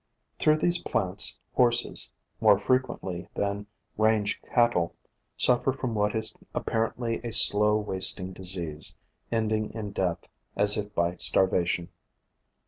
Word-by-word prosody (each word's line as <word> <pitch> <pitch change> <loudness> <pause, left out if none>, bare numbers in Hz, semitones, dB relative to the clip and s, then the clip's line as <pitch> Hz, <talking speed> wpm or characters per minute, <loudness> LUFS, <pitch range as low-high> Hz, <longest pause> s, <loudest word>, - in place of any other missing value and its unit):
Through 155 0 +3
these 175 +2 +1
plants 95 -1 +2
horses, 120 -1 +1 0.3
more 100 - +4
frequently 100 -6 -2
than 100 0 -3 0.3
range 110 -1 +1
cattle, 120 -9 0 0.4
suffer 125 +1 +2
from 130 -3 -5
what 105 0 -1
is 110 0 -1 0.2
apparently 115 +1 -3
a 120 - -5
slow 105 -1 +5
wasting 95 -2 +1
disease, 90 -5 -2 0.4
ending 110 -1 -1
in 105 -3 -6
death, 90 -3 -3 0.3
as 105 0 +7
if 105 0 -5
by 85 +1 -1
starvation. 90 -2 +1
105 Hz, 120 wpm, -26 LUFS, 95-115 Hz, 0.4 s, as